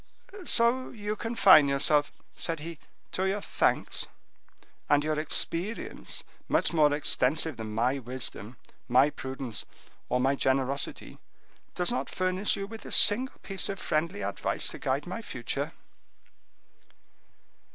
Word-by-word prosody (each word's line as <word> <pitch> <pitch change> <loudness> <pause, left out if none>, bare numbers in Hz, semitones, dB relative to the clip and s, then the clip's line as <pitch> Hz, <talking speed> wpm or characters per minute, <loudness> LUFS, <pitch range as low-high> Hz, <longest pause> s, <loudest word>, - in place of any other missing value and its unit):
"So 245 +1 +3
you 210 -2 -5
confine 200 -10 +5
yourself," 145 +2 +1
said 165 -1 -4
he, 165 0 -8 0.3
"to 190 +1 -1
your 195 +2 -1
thanks—and 145 -6 -2
your 155 0 -1
experience, 170 +7 -1 0.3
much - - +1
more 150 -3 +4
extensive 145 0 +1
than 110 -1 -7
my 125 +5 0
wisdom, 125 -2 -4 0.3
my 130 +4 +4
prudence, 130 -4 -7 0.5
or 125 - 0
my 135 +2 +2
generosity, 135 +1 -2 0.6
does 180 +5 +1
not 245 - -3
furnish 185 +2 -1
you 195 - -5
with 225 +2 -10
a - - -10
single 250 +6 +8
piece 195 -2 +1
of 195 - -4
friendly 170 +4 -2
advice - - -1
to - - -9
guide - - -2
my - - -6
future." - - -5
155 Hz, 125 wpm, -28 LUFS, 135-195 Hz, 0.6 s, single